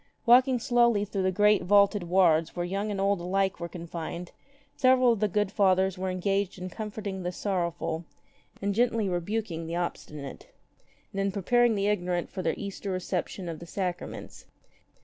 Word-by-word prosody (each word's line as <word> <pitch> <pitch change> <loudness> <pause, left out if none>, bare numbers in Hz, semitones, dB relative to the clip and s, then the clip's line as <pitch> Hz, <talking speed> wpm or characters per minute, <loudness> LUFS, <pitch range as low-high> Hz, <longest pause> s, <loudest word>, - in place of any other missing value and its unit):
Walking 250 +2 +6
slowly 235 -4 +3
through 200 -1 -3
the 185 0 +2
great 210 +1 +4
vaulted 200 +1 +4
wards 170 -3 +3
where 175 -1 -2
young 195 +4 -2
and 200 -2 -3
old 195 -1 +1
alike 190 +2 0
were 170 0 -5
confined, 170 0 -6 0.4
several 255 -2 +5
of 230 - 0
the 210 - +2
good 205 0 0
Fathers 190 -2 +3
were 190 0 -3
engaged 195 +1 -1
in 185 0 -6
comforting 205 -2 -5
the 180 0 -2
sorrow 180 -2 -1
ful, 165 0 -4 0.6
in 200 0 +1
gently 230 -1 +1
rebuking 175 -2 -2
the 165 - -3
obstinate, 150 -5 -5 0.7
and 195 - -1
in 195 0 0
preparing 235 +4 +2
the 200 -1 0
ignorant 180 -4 -1
for 190 - -4
their - - 0
Easter 200 0 -6
reception 185 0 -3
of 165 -2 -5
the 170 - -10
sacraments. 180 -1 -5
195 Hz, 170 wpm, -28 LUFS, 175-210 Hz, 0.7 s, Walking